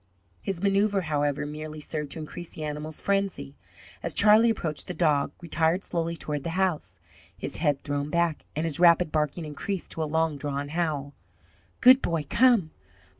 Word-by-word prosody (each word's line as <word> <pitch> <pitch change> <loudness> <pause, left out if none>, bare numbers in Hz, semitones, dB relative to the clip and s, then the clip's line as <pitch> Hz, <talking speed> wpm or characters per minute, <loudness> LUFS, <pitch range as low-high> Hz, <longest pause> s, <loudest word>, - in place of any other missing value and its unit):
His 195 -2 -4
manoeuvre, 200 0 +2
however, 145 -2 0
merely 155 +1 -7
served 150 -1 -4
to - - -8
increase 165 +2 -6
the 155 - -6
animal's 150 +1 -4
frenzy. 195 -8 -1 0.5
As 170 - -2
Charlie 215 +3 +6
approached 160 -9 -3
the 180 - -5
dog 150 -5 +2
retired 170 +2 0
slowly 170 -1 -2
toward 150 -3 -4
the - - -3
house, 185 -5 -1 0.4
his - - -5
head 145 -4 0
thrown 145 0 -2
back, 170 -1 0
and 155 +2 -1
his 160 -2 -1
rapid 175 -1 +5
barking 155 +2 -1
increased 165 +6 -5
to 160 - -3
a - - +1
long 160 -1 +1
drawn 145 0 -3
howl. 150 -4 -2 0.7
"Good 255 +1 +8
boy, 165 -3 -1
come! 230 - +4
160 Hz, 170 wpm, -27 LUFS, 150-180 Hz, 0.7 s, Good